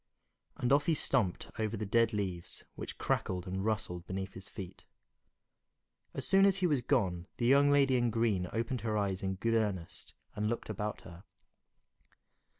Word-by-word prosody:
And 125 +2 +2
off 145 +1 +3
he 165 - +4
stumped 120 -12 0
over 110 0 -1
the 105 - -3
dead 115 +3 +3
leaves, 95 -5 -3
which - - -7
crackled 90 -1 -1
and 95 +1 -3
rustled 90 -5 -2
beneath 95 +1 -4
his 95 0 -8
feet. 95 -5 -9 1.3
As - - +2
soon 195 0 +5
as 195 -1 +5
he 185 - +1
was 145 -7 +2
gone, 95 -9 0
the 120 - -1
young 140 +3 +6
lady 140 -2 +4
in 120 -1 +2
green 110 -5 +1
opened 115 +1 -2
her 110 -1 -1
eyes 100 -2 -1
in 95 0 -1
good 115 +5 0
earnest 100 -7 -2 0.2
and 105 +1 0
looked 115 -1 -3
about 105 0 -4
her. 90 +1 -12
110 Hz, 170 wpm, -32 LUFS, 95-120 Hz, 1.3 s, young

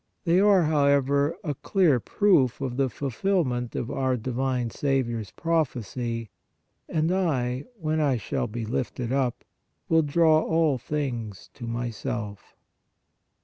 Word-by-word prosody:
They 175 +1 +3
are, 200 -3 +5
however, 140 0 +2
a 150 -5 -1
clear 160 - +2
proof 155 - +2
of 130 -3 -3
the 135 0 +1
fulfilment 135 - -1
of 120 - -3
our 130 -1 0
divine 125 0 -1
Saviour 130 -4 0
s 105 - -9
prophecy: 120 - -2 0.3
" - - -41
And 160 +1 +1
I, 135 -9 0
when 155 -1 0
I 140 -4 +2
shall 115 +2 -2
be 115 +1 -5
lifted 120 +1 -3
up, 130 -3 0 0.5
will 165 0 +5
draw 155 +1 +4
all 160 -6 +1
things 120 -8 -4
to 120 - -8
Myself." 115 -3 -4
135 Hz, 135 wpm, -26 LUFS, 120-155 Hz, 0.5 s, are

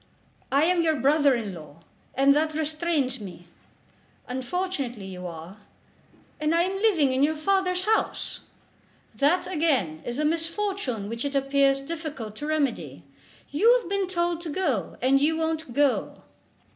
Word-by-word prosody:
"I 280 +2 +4
am 350 +1 +3
your 320 -1 +2
brother 285 0 +3
in 215 -5 -4
law, 160 -1 -12 0.3
and 275 +1 +5
that 310 +1 +1
restrains 310 -4 -1
me." 175 -4 -10 0.8
"Unfortunately 260 - -3
you 180 -1 -7
are." 170 +3 -9 0.8
"And 305 +2 +1
am 365 +3 +1
living 355 -11 +3
in 260 - +1
your 305 +2 +3
father's 365 +2 +1
house." 440 +1 0 0.7
"That, 295 +6 +2
again, 275 - 0
is 240 +1 -4
a 300 - 0
misfortune 330 - -1
which 230 +2 -4
it 285 0 -3
appears 275 0 +3
difficult 290 -8 -6
to 295 - -5
remedy. 295 -6 -1 0.5
You 450 +12 +5
have 475 - -10
been 395 -1 0
told 345 -2 -1
to 340 - -6
go, 290 - -1
and 270 +2 +4
you 320 +2 +2
won't 320 -3 -2
go." 285 +1 0
295 Hz, 145 wpm, -26 LUFS, 255-335 Hz, 0.8 s, and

